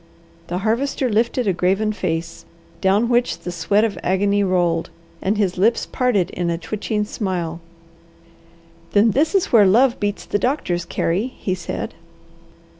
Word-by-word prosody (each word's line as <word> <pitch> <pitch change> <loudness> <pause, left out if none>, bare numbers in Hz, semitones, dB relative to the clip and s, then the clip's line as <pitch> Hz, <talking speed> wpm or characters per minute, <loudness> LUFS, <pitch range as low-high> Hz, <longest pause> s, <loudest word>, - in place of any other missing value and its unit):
The 175 - -2
Harvester 235 +5 0
lifted 235 +3 +1
a 195 - +3
graven 195 +5 +1
face, 165 -3 -3 0.4
down 200 +4 +3
which 240 0 +1
the 180 - -5
sweat 175 +5 +1
of 225 -3 -1
agony 200 +2 +1
rolled, 175 -3 +1 0.3
and 205 +3 0
his 190 -3 0
lips 225 +5 +2
parted 215 -8 0
in 175 -1 -2
a 170 - -1
twitching 210 +3 -3
smile. 180 -6 -3 1.3
"Then 210 +2 +5
this 310 - +1
is 385 - +1
where 210 -4 +7
love 235 +6 +4
beats 205 -1 -2
the 205 - -1
doctors, 180 - -1
Carey!" 175 +6 -1
he 185 - -2
said. 180 -2 -5
200 Hz, 150 wpm, -21 LUFS, 180-225 Hz, 1.3 s, where